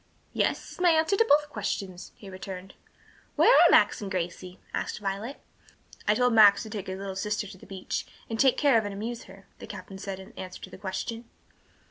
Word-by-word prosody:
"Yes, - - 0
is - - -12
my 360 - +6
answer 320 +3 +3
to 455 - +4
both 295 -6 +4
questions," 195 -4 -4
he 200 - -13
returned. 190 0 -8 0.6
"Where - - +6
are - - +7
Max - - +4
and 200 - -4
Gracie?" 180 0 -4
asked - - -3
Violet. 205 +6 -4 0.7
"I 210 - +4
told 250 +1 +3
Max 210 -2 +7
to 220 - -9
take 205 -3 -5
his 190 0 -4
little 195 -1 -5
sister 210 +2 -2
to 195 -1 -10
the - - -15
beach, 190 -1 -4 0.2
and 225 -1 -4
take 265 -2 +4
care 280 -6 +4
of 220 - -4
and 205 -1 -5
amuse 230 +3 -5
her," 195 +1 -15
the - - -9
captain 190 -1 -9
said 195 -1 -5
in 190 - -12
answer 185 -1 -8
to - - -9
the - - -11
question. 225 +4 -4
205 Hz, 210 wpm, -27 LUFS, 190-230 Hz, 0.7 s, are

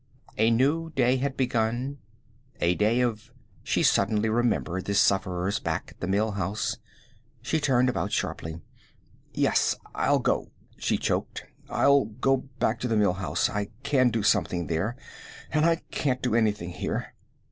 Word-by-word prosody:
A 110 +1 +3
new 145 +8 +2
day 125 0 +3
had 135 +1 -2
begun, 125 +2 -1 0.6
a 85 +1 +3
day 110 +6 +2
of 115 -4 -2 0.3
She - - 0
suddenly 110 0 +2
remembered 110 -5 0
the 100 - -1
sufferers 95 0 +2
back - - -3
at - - -20
the 90 - -3
Mill 105 +3 +1
House. 105 +2 -2 0.7
She 150 +5 0
turned 130 -4 +3
about 125 - -1
sharply. 80 +1 -3 0.7
"Yes, - - +2 0.2
I'll - - +2
go," - - 0 0.3
she - - 0
choked. - - -2 0.2
"I'll 140 -2 +4
go 125 +5 +1 0.2
back - - 0
to 125 - -2
the 115 -2 +1
Mill 100 -3 +3
House. 95 -1 0
I 100 0 -2 0.2
can 135 -3 +3
do 115 -2 -1
something 90 -5 +1
there, 90 +9 -1 0.6
and 155 0 +2
I 165 - +4 0.2
can't 130 -3 -1
do 125 - 0
anything 105 -6 +1
here. - - -4
110 Hz, 155 wpm, -27 LUFS, 100-130 Hz, 0.7 s, I'll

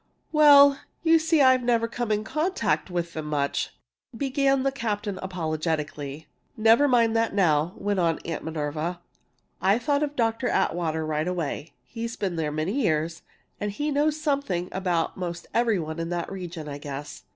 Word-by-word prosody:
"Well, 285 -2 +7 0.2
you 330 0 +5
see 320 -1 +2
I've 260 -1 +6
never 235 -1 +2
come 235 -1 -3
in 210 0 +1
contact 315 - -1
with 170 -1 -3
them 155 -1 -5
much 145 -2 -1 0.2
" - - -17
began 275 0 +1
the 275 - +1
captain, 210 -6 -3
apologetically. 155 -4 -3 0.3
"Never 225 +6 +5
mind 230 -3 +3
that 225 -2 +1
now," 165 -3 +2
went 205 -1 -1
on 165 -2 +2
Miss 165 -2 -3
Minerva. 160 +2 -3 0.6
"I 195 +3 +4
thought 285 +3 0
of 295 -1 -2
Dr. 230 0 0
Atwater 160 -6 0
right 155 +1 -1
away. 165 -3 -3
He's 230 0 -5
been 190 -4 -2
there 155 -2 -1
many 165 - -1
years, 165 -4 0 0.4
and 205 0 -4
knows 300 +2 +1
something 275 - -1
about 180 -3 -1
most 175 -2 -5
every 230 -3 +2
one 160 -1 -4
in 165 0 -3
the 175 -1 -2
region, 175 -5 -7
I 145 -1 -6
guess. 145 0 -7
190 Hz, 165 wpm, -26 LUFS, 160-245 Hz, 0.6 s, Well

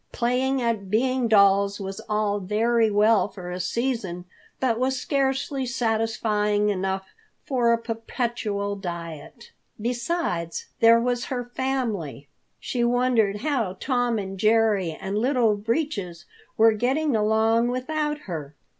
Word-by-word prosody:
Playing 255 +2 0
at 220 -5 -1
being 250 +3 +1
dolls 200 -1 +4
was 195 +1 -5
all 210 -1 0
very 220 +4 +2
well 210 0 +4
for 185 -3 -8
a 180 - -4
season, 190 -3 -2 0.3
but 240 -3 +1
was 260 +1 0
scarcely 270 0 -1
satisfying 220 -3 0
enough 190 -1 -2 0.4
for 245 -4 +2
a 235 - +4
perpetual 225 -3 -3
diet. 170 - -8 0.3
Besides, 235 - -2
there 230 0 +6
was 245 0 -1
her 245 -2 -4
family. 215 - -2 0.3
She 245 -2 -2
wondered 235 -4 +2
how 235 -10 -1
Tom 245 -3 0
and 195 -2 -5
Jerry 215 -4 +3
and 195 +2 -2
Little 240 -3 +2
Breeches 205 - -3 0.3
were 225 +1 +6
getting 265 +5 0
along 220 +2 +2
without 295 +4 -2
her. 155 - -7
225 Hz, 125 wpm, -25 LUFS, 200-245 Hz, 0.4 s, there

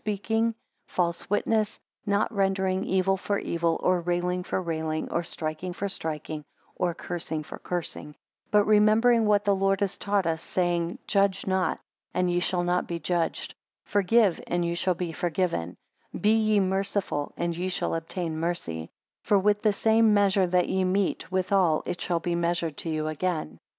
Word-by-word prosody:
speaking; 225 +2 0 0.3
false 170 -1 -1
witness; 210 +1 +1 0.3
not 205 +3 +1
rendering 190 -1 +1
evil 190 0 +2
for 200 +1 -1
evil, 170 -2 0
or 180 -1 +3
railing 175 +1 0
for 180 - -2
railing, 160 -3 -2
or 170 - +1
striking 160 +2 -4
for 200 +3 -3
striking, 155 -4 -4 0.3
or 180 -1 0
cursing 160 -4 -4
for - - -9
cursing: 175 -4 -4
10 150 0 -12 0.3
But 210 -1 +4
remembering 215 +2 +4
what 205 0 +3
the 200 - +4
Lord 195 0 +2
has 195 -2 -1
taught 200 -2 +1
us 165 -1 -1
saying, 175 -1 -1
Judge 200 -1 +1
not, 190 -3 0 0.4
and 180 -1 +2
ye 175 - +2
shall 175 0 0
not 180 0 0
be 170 - -3
judged; 170 +1 -1 0.3
forgive 205 -1 +3
and 175 0 0
ye 170 - 0
shall 180 +1 0
be 170 -1 -3
forgiven; 165 - -1 0.4
be 210 - +3
ye 215 -2 +3
merciful, 190 -5 -1
and 170 0 -1
ye 180 +2 -2
shall 185 - -1
obtain 165 0 -3
mercy; 85 - -3 0.3
for 205 - +3
with 205 +1 +2
the 215 - +4
same 220 +1 +4
measure 195 -2 +3
that 180 0 +2
ye 190 0 +1
meet 185 -2 0
withal, 185 -3 +2
it 175 - -4
shall 175 -2 0
be 175 - -1
measured 170 -2 0
to 165 - -5
you 155 -1 -1
again. 155 - -2
180 Hz, 170 wpm, -27 LUFS, 170-200 Hz, 0.4 s, But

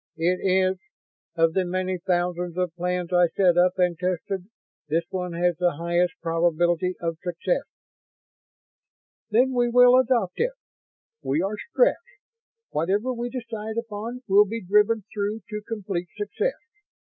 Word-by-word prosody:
"It 175 +3 +1
is. 185 0 +2 0.6
Of 165 -1 +3
the 190 - +2
many 185 0 -2
thousands 175 0 -1
of 180 -2 -1
plans 180 0 -2
I 175 -1 +5
set 175 +1 +3
up 180 +1 +3
and 180 -2 +2
tested, 180 +1 -2 0.4
this 165 +3 +1
one 180 -2 -3
has 175 0 +1
the 175 0 +2
highest 170 +2 0
probability 175 +2 +1
of 165 -1 -3
success." 175 - -2 1.6
"Then 250 +4 +3
we 245 -1 +2
will 250 +1 +7
adopt 240 -8 +1
it. - - +1 0.7
We 150 +6 0
are 195 +2 -1 0.2
Stretts. - - +3 0.7
Whatever 200 +11 0
we 240 0 -4
decide 225 -3 -6
upon 230 +2 -5
will 205 +1 +6
be 225 +2 -5
driven 210 +3 +3
through 210 +1 -2
to 210 0 -4
complete 195 -5 -3
success. 420 - -2
185 Hz, 140 wpm, -25 LUFS, 175-220 Hz, 1.6 s, will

